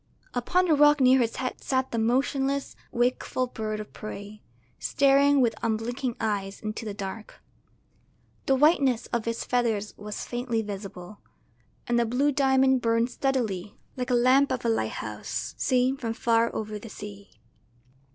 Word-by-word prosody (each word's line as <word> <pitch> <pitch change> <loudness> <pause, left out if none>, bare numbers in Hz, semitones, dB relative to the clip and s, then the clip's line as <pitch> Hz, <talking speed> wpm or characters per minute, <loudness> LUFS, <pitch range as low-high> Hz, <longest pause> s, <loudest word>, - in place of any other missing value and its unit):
Upon 360 +10 +1
the 335 - +3
rock 295 0 +5
near 260 0 +6
his 230 -2 0
head 255 -1 -4
sat 260 -1 0
the 230 - -1
motionless, 270 +4 0 0.2
wakeful 250 +1 0
bird 215 -3 -4
of 215 - -8
prey, 210 0 -8 0.4
staring 280 0 +4
with 235 -3 +3
unblinking 235 +3 -2
eyes 200 -3 -2
into 215 +1 -5
the 210 - -4
dark. 200 +1 -7 1.1
The 270 - +4
whiteness 275 -4 +3
of 235 -1 -1
its 230 0 -2
feathers 225 -4 0
was 210 0 -6
faintly 240 -2 -2
visible, 195 -1 -8 0.7
and 240 0 +1
the 235 - +2
blue 270 +5 +2
diamond 265 -2 +3
burned 230 +1 +1
steadily 225 -9 -2 0.2
like 250 -1 -3
the 250 - +2
lamp 260 +3 +4
of 255 -2 -2
a - - +3
lighthouse 110 - -3
seen 255 +1 +2
from 230 -4 -3
far 230 0 +2
over 215 -1 -4
the 225 - -10
sea. 205 -1 -10
240 Hz, 150 wpm, -27 LUFS, 215-265 Hz, 1.1 s, near